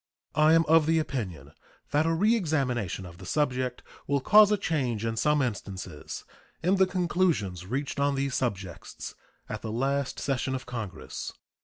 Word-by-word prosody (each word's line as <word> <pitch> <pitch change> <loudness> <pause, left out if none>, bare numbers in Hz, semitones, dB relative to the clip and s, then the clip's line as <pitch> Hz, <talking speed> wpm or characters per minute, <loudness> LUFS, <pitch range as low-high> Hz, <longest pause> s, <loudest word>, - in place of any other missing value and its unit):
I 155 +2 +5
am 165 0 +5
of 160 0 +5
the 165 0 +3
opinion 125 - -3 0.4
that 150 +2 +3
a 165 - +2
reexamination 145 - +1
of 85 0 -11
the 95 - -9
subject 130 -1 0 0.2
will 140 0 +2
cause 210 +9 +7
a 210 - +4
change 130 - -1
in 115 0 -1
some 150 +4 +2
instances 95 - -5 0.4
in 185 +3 +3
the 190 0 +5
conclusions 170 - 0
reached 140 +5 -2
on 140 0 +2
these 135 -1 -1
subjects 95 - -4 0.3
at - - -5
the 110 - -4
last 135 +3 -1
session 130 -1 -1
of 130 - -5
Congress. 110 -6 -6
135 Hz, 160 wpm, -28 LUFS, 115-160 Hz, 0.4 s, cause